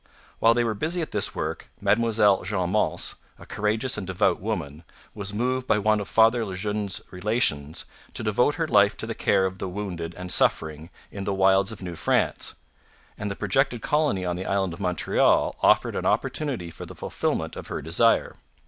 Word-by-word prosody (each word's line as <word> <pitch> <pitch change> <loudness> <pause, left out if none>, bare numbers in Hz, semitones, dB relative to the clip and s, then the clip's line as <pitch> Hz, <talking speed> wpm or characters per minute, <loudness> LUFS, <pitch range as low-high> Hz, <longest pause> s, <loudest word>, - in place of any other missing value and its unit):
While 115 +1 +5
they 120 - +2
were 115 -2 0
busy 165 - -2
at - - -7
this 105 - 0
work, - - -4
Mademoiselle 105 -1 +3
Jeanne 90 -4 -1
Mance, 105 - +1 0.2
a - - -13
courageous 110 +3 -1
and 95 - -6
devout 95 -1 +1
woman, 75 +3 -4 0.3
was 100 -2 -4
moved 125 +4 -1
by - - +3
one 110 +1 +2
of 100 - -5
Father 115 +1 +4
Le 95 -4 -5
Jeune's 105 0 -2
Relations 90 - 0 0.3
to - - -3
devote 110 +7 +2
her 165 -1 -1
life 100 -5 +4
to - - -3
the - - -4
care 95 - +2
of 95 0 -4
the 95 - -3
wounded 90 -4 -5
and 90 0 -3
suffering 80 -1 +1 0.2
in 100 -1 -6
the 100 0 -1
wilds 95 +1 +3
of 105 -3 -8
New 90 -2 -5
France; - - 0 0.6
and 105 - -4
the 100 - -4
projected 115 +4 0
colony 150 -12 +1
on 90 -1 -1
the 95 - -5
island 95 -3 0
of 85 - -10
Montreal 90 -3 +2
offered - - +3
an - - -1
opportunity 125 - -1
for - - -9
the - - -10
fulfilment - - -2
of - - -8
her - - -4
desire. 85 +10 +2
100 Hz, 195 wpm, -25 LUFS, 95-115 Hz, 0.6 s, While